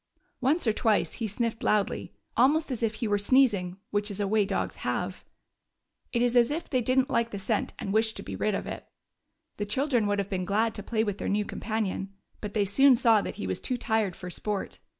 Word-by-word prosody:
Once 280 +6 +1
or 220 - +3
twice 215 -1 +1
he 230 - -3
sniffed 225 +2 -2
loudly, 210 -2 0 0.2
almost 290 +5 +3
as 245 - -3
if 225 -1 0
he 225 - -2
were 205 -1 +2
sneezing 200 -6 +3
— - - -51
which 205 +1 0
is 200 0 -3
a 200 - 0
way 210 0 +3
dogs 195 - -2
have. - - -3 0.9
It 240 -1 +1
is 245 0 +1
as 235 -1 +5
if 320 +4 -3
they 255 -3 +1
did 255 +3 +1
n't 260 0 +3
like 235 0 +1
the 205 - -5
scent 210 +2 -1
and 195 - -4
wished 220 0 +2
to - - -7
be - - -6
rid 210 -1 0
of - - -3
it. - - -7 0.7
The 205 - -2
children 245 0 +1
would 205 0 +1
have 200 -1 -1
been 190 -2 -2
glad 215 +3 +1
to 205 - -6
play 220 +1 0
with 205 -3 -3
their - - -2
new 205 +1 +1
companion, 200 -3 -3 0.2
but 210 0 -6
they 205 -2 +3
soon 270 +7 +6
saw 230 -3 +4
that - - -5
he 210 - -5
was - - -3
too 255 - -1
tired 220 -6 0
for 180 -1 -8
sport. 205 +2 -4
220 Hz, 235 wpm, -28 LUFS, 205-240 Hz, 0.9 s, soon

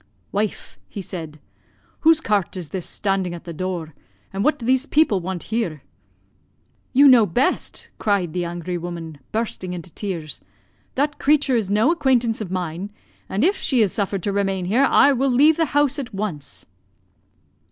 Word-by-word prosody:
"'Wife,' 210 +1 -3
he - - -7
said, 160 -5 -6 0.6
'whose 320 0 +5
cart 205 - 0
is 170 -5 -6
this 180 +2 -5
standing 195 -3 -1
at 170 - -10
the 170 -1 -7
door, 170 -2 -4 0.4
and 195 +1 -1
what 300 +3 +3
do 235 - -7
these 260 +3 +2
people 290 -10 +3
want 180 0 -4
here?' 170 - -2 1.1
"'You 280 +2 +7
know 240 -5 +7
best,' 245 +10 -1
cried 195 -6 0
the 180 - -1
angry 175 +1 -4
woman, 165 -3 -7
bursting 215 -5 -3
into 175 -1 -8
tears; 170 -7 -5 0.5
'that 290 +2 0
creature 290 -2 +3
is 215 -5 0
no 215 +9 +3
acquaintance 250 -9 +1
of 200 - -4
mine, 180 +1 -3 0.4
and 200 +5 0
if 385 +5 +3
she 250 -5 +2
is 200 - 0
suffered 195 -3 -2
to 200 - -1
remain 195 -2 0
here, 235 +9 +3
I 280 +1 +5
will 270 +1 +1
leave 290 +6 +5
the 330 - +3
house 290 -1 +2
at 245 -6 -6
once.' 185 -9 -5
200 Hz, 170 wpm, -22 LUFS, 175-255 Hz, 1.1 s, You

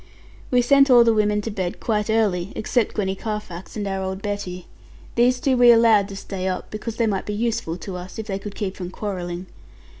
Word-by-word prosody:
We 250 -1 +3
sent 275 +2 +5
all 245 -2 +8
the 230 -1 +4
women 210 -1 +2
to 225 - -4
bed 185 -3 -3
quite 210 -1 -1
early, 200 -5 +1
except 225 +1 0
Gwenny 190 -2 0
Carfax 210 -3 -6
and 205 -1 -2
our 195 0 -2
old 190 0 -3
Betty. 195 -4 -4 0.5
These 245 +1 +3
two 265 0 +2
we 245 -1 +6
allowed 225 -3 +5
to 200 - -8
stay 195 -1 -5
up, 185 -1 -3
because 215 +1 -5
they 230 - +1
might 200 -3 -1
be 210 - -2
useful 215 -7 -1
to 185 0 -6
us, 180 +1 -9
if 220 - -4
they 195 -2 -3
could 205 0 -8
keep 195 -2 -3
from 180 -2 -6
quarreling. 180 -3 -5
210 Hz, 215 wpm, -23 LUFS, 190-225 Hz, 0.5 s, all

